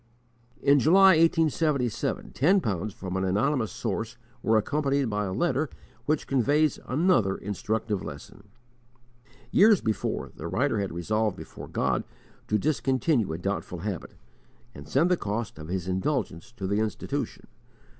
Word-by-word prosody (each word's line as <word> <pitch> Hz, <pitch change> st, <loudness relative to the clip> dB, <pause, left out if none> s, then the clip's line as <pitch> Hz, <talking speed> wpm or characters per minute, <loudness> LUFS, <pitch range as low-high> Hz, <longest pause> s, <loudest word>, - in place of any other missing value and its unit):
In 140 Hz, 0 st, +5 dB
July, 190 Hz, +8 st, +6 dB
1877, 160 Hz, -, +2 dB
ten 180 Hz, +9 st, +3 dB
pounds 105 Hz, -, -2 dB
from 95 Hz, -1 st, -6 dB
an 95 Hz, -, 0 dB
anonymous 110 Hz, +4 st, +1 dB
source 115 Hz, +3 st, -3 dB, 0.2 s
were 110 Hz, 0 st, +3 dB
accompanied 140 Hz, +1 st, 0 dB
by 105 Hz, 0 st, -1 dB
a 95 Hz, -, -3 dB
letter 145 Hz, -, 0 dB, 0.4 s
which 155 Hz, 0 st, +1 dB
conveys 145 Hz, +3 st, +2 dB
another 130 Hz, -, +2 dB
instructive 105 Hz, 0 st, -2 dB
lesson. 75 Hz, +7 st, -9 dB, 1.1 s
Years 210 Hz, -1 st, +6 dB
before, 110 Hz, -2 st, -2 dB
the -, -, -6 dB
writer 120 Hz, +3 st, 0 dB
had 100 Hz, -1 st, -2 dB
resolved 105 Hz, +5 st, -1 dB
before -, -, -9 dB
God -, -, 0 dB, 0.4 s
to 105 Hz, -, +2 dB
discontinue 135 Hz, -, +1 dB
a 80 Hz, -, -3 dB
doubtful 90 Hz, -1 st, -3 dB
habit, 100 Hz, -3 st, -5 dB, 0.6 s
and 70 Hz, +1 st, -11 dB
send 165 Hz, +7 st, +3 dB
the 180 Hz, -, +4 dB
cost 105 Hz, -, -4 dB
of 75 Hz, -, -8 dB
his 90 Hz, 0 st, -3 dB
indulgence 95 Hz, -, -2 dB
to 100 Hz, -5 st, -6 dB
the 100 Hz, +2 st, 0 dB
Institution. 110 Hz, -3 st, -3 dB
110 Hz, 140 wpm, -27 LUFS, 100-145 Hz, 1.1 s, July